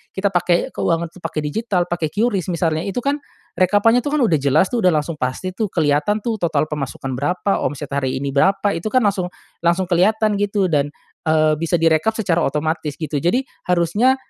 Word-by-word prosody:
kita 195 +1 0
pakai 175 -1 +1
keuangan 165 0 -1
tuh 185 - -15
pakai 155 - -3
digital, 190 +3 0
pakai 170 -2 -2
QRIS 205 -2 0
misalnya 165 -2 0
itu 195 - -4
kan 285 +1 0 0.4
rekapannya 205 +6 +4
tuh 290 +4 -2
kan 300 - +1
udah 165 -9 +3
jelas 145 +6 +3
tuh 245 - 0
udah 185 - +4
langsung 155 +1 -1
pasti 130 +9 -2
tuh 215 +3 -1
kelihatan 165 +5 +1
tuh 230 -2 -1
total 155 -4 +1
pemasukan 135 -2 -4
berapa, 180 +8 0
omset 145 -1 -4
hari 140 -2 -1
ini 140 +1 -3
berapa, 195 +7 +2
itu 165 - -4
kan 255 -2 +4
langsung 195 -3 +1 0.3
langsung 170 +2 +2
kelihatan 210 +4 +2
gitu 200 -3 0
dan, 145 -1 +1 0.4
eee, 155 -1 +3
bisa 165 +1 0
direkap 165 +7 +3
secara 185 -7 +1
otomatis 150 0 -2
gitu 150 -1 -3
jadi 200 - +1 0.2
harusnya, 180 +9 +3
175 Hz, 190 wpm, -20 LUFS, 155-205 Hz, 0.4 s, rekapannya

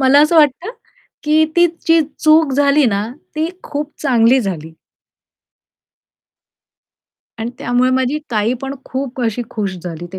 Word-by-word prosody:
मला 270 +2 +5
असं 325 +2 +2
वाटतं, 305 - +3 0.5
की 310 +1 +3
ती 345 0 +6 0.2
जी 330 0 +5 0.2
चूक 310 -2 +4
झाली 280 +1 +3
ना, 205 -2 0 0.3
ती 315 +1 -1 0.2
खूप 295 +1 -5
चांगली 250 -2 +3
झाली. 165 -7 -5 2.6
आणि 225 +1 -4
त्यामुळे 245 +1 +1
माझी 260 +3 0
ताई 220 0 0
पण 270 0 -4
खूप 260 -1 -5
अशी 230 +1 -1
खुश 205 -5 -3
झाली 170 -1 -6
ते 190 - -6
260 Hz, 135 wpm, -17 LUFS, 225-300 Hz, 2.6 s, ती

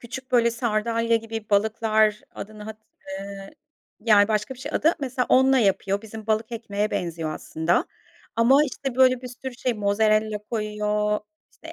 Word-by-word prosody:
küçük, 260 +2 -8
böyle, 235 -1 +4
sardalya 230 0 0
gibi 225 -1 -6
balıklar, 215 0 +2
adını 215 +1 -9
hat, 220 +1 -8 0.3
eee, 195 0 -7 0.5
yani 210 -2 +5
başka 215 +4 -1
bir - - -17
şey 285 +4 -7
adı. 325 +2 +3
Mesela 255 -2 -1
onunla 265 +1 +5
yapıyor, 200 -2 +1
bizim 220 0 -9
balık 220 +1 0
ekmeğe 210 -2 -2
benziyor 165 -3 -3
aslında. 160 +3 -1 0.5
Ama, 265 +6 +5
işte, 270 -2 -5
böyle 255 -1 +4
bir 250 - -6
sürü 255 +1 -8
şey, 250 0 -1
mozerella 215 +1 +1
koyuyor, 210 -1 -1 0.3
işte, - - -12
220 Hz, 155 wpm, -24 LUFS, 210-240 Hz, 0.5 s, yani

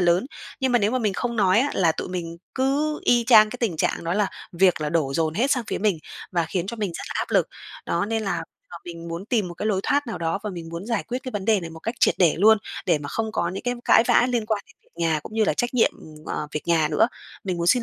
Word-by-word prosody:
lớn 175 +6 +3 0.3
nhưng 260 -1 +1
mà 245 - +5
nếu 205 0 +1
mà 255 - 0
mình 210 -4 0
không 235 +3 -3
nói 195 -2 +4
á, 285 - +1
là 165 -4 +3
tụi - - -5
mình 170 -2 -5 0.2
cứ 285 +3 0
y 240 -1 +4
chang 215 -3 +7
cái 250 - -6
tình 210 -9 0
trạng 155 - -1
đó 170 +3 -1
là 210 -1 +2 0.3
việc 180 -1 +3
là 150 - -1
đổ 150 -5 0
dồn 160 -1 0
hết 255 +7 +1
sang 250 -4 +1
phía - - -2
mình 200 -5 +1 0.3
và 170 -2 +1
khiến 175 +2 -2
cho 235 - -5
mình 205 -5 -2
rất - - -5
là - - -6
áp - - -2
lực. - - +3 0.4
Đó, 170 +2 0
nên 225 0 -1
là 195 - -2 0.3
giờ - - -8
mình 170 -1 -8
muốn 170 +4 -5
tìm 215 -6 0
một 175 - -8
cái 205 - -4
lối 200 -3 +1
thoát 285 +4 +1
nào 225 - -4
đó 165 +3 -1
và 210 - -3
mình 170 -3 -7
muốn 170 +4 -6
giải 230 -3 0
quyết 250 +1 -2
cái 255 - -5
vấn 205 -2 -3
đề 210 -2 +3
này 165 -1 -7
một 160 - -11
cách 225 +7 -3
triệt - - +4
để 175 -4 +4
luôn 220 +2 +6 0.3
để - - +3
mà 145 -1 -7
không 220 +4 -2
có 170 - 0
những 185 +3 -5
cái 245 0 -1
cãi 225 - +6
vã 245 - +5
liên 235 -3 0
quan 215 -2 -1
đến - - -21
việc - - -31
nhà 160 -2 +1
cũng 215 - -10
như 220 - +3
là - - +1
trách 245 +1 -1
nhiệm, 235 - +4
ừm, 155 -1 -13
ờ, - - -3
việc 150 - -3
nhà 160 -3 +3
nữa. 155 +9 +3 0.4
Mình 185 -3 -2
muốn 170 - -2
xin 245 +7 +4
195 Hz, 300 wpm, -24 LUFS, 170-230 Hz, 0.4 s, chang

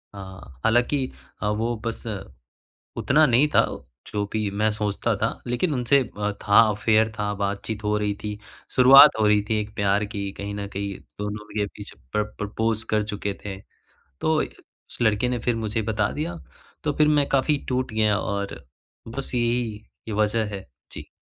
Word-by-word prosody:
हाँ। 95 -9 -11
हालाँकि 125 +4 +2 0.3
अ, 105 - 0
वो 115 +3 0
बस 115 0 -4 0.9
उतना 155 +4 +4
नहीं 130 +2 +4
था - - +6 0.4
जो 105 -1 -2
भी 110 -2 0
मैं 105 +2 +1
सोचता 105 -1 -1
था। - - -1
लेकिन 135 +7 0
उनसे 125 +1 +3 0.2
अ, 105 0 0
था 100 -1 +6
अफेयर 110 +1 +2
था, 105 0 0
बातचीत 100 +2 -3
हो 105 0 +1
रही 105 -1 0
थी। 105 -1 -4 0.4
शुरुआत 135 +2 +9
हो 110 - +4
रही 105 0 +4
थी 110 -1 +2
एक 105 0 -8
प्यार 100 +1 +2
की 100 -2 -4
कहीं 100 0 -4
न 100 -1 -4
कहीं 100 -1 -3 0.2
दोनों 105 +1 -4
के 105 -1 0
बीच 100 +1 -10 0.2
प्र 105 - +2
प्रपोज़ 110 +1 -1
कर 105 -1 +2
चुके 105 -1 -3
थे। 95 -2 -5 0.6
तो 160 - +2
उस - - -10
लड़के 110 +1 +2
ने 125 -1 -1
फिर 120 +1 0
मुझे 110 0 -2
बता 105 -1 0
दिया 170 +3 -4 0.5
तो 150 -2 0
फिर 150 +1 +3
मैं 145 -2 +3
काफ़ी 140 +2 +2
टूट 130 -1 -1
गया 110 -2 +3
और 100 -8 -4 0.4
बस 130 +4 -4
यही, 120 -2 0 0.3
ये 110 - -3
वजह 110 +1 +1
है। 95 - -9 0.2
जी। - - -9
110 Hz, 175 wpm, -24 LUFS, 105-120 Hz, 0.9 s, शुरुआत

